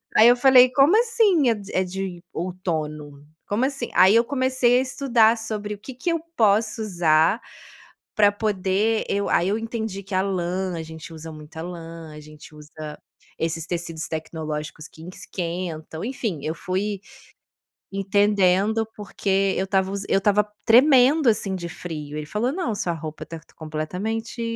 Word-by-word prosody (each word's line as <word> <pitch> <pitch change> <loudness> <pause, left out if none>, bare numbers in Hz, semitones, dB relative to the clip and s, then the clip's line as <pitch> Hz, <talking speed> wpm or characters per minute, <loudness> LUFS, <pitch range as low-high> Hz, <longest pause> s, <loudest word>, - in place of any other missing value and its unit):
Aí 220 - +8
eu 245 - +6
falei: 255 -1 +7
"Como 285 +9 +5
assim 425 - +3
é 230 - +2
d 200 -1 -10
é 185 - +2
de 185 -1 -5
outono? 155 -5 -4 0.2
Como 215 +5 0
assim?" 275 -3 -3
Aí 190 +3 +6
eu 230 - +5
comecei 255 -2 +2
a - - +2
estudar 240 -4 +3
sobre 210 -2 -4
o - - -8
que 260 +5 -9
que 275 +8 -2
eu 335 - 0 0.2
posso 215 0 +2
usar 175 0 +2 0.7
pra 205 -1 +5
poder 205 +1 0
eu 200 0 0
aí 180 +3 +2
eu 210 - +1
entendi 220 -3 -4
que 195 0 -5
a 185 - +3
lã, 185 -1 -2
a 160 - -4
gente 160 +1 -10
usa 160 0 -8
muita 155 +1 -10
lã, 165 -2 -8
a 150 - -9
gente 155 0 -14
usa 150 0 -9 0.4
esses 165 0 -2
tecidos 170 -2 -4
tecnológicos 155 -1 -5
que 160 - -16
esquentam, 170 -3 -5
enfim, 230 - -3
eu 155 - -1
fui 195 +2 -3 0.9
entendendo 200 +2 +2
por 210 -1 -10
que 195 -1 +1
eu 190 - 0
estava 190 -1 0
us 200 0 -3
eu 195 - +3
estava 210 +1 +2 0.2
tremendo, 265 +4 +6
assim, 205 -3 0
de 170 - -5
frio. 150 -4 -7
Ele 150 - -4
falou: 215 +9 -1
"Não, 300 - -2
sua 175 -4 -1
roupa 155 -1 -7
tá 165 - -8 0.2
completamente 185 +10 -4
195 Hz, 165 wpm, -23 LUFS, 165-225 Hz, 0.9 s, Aí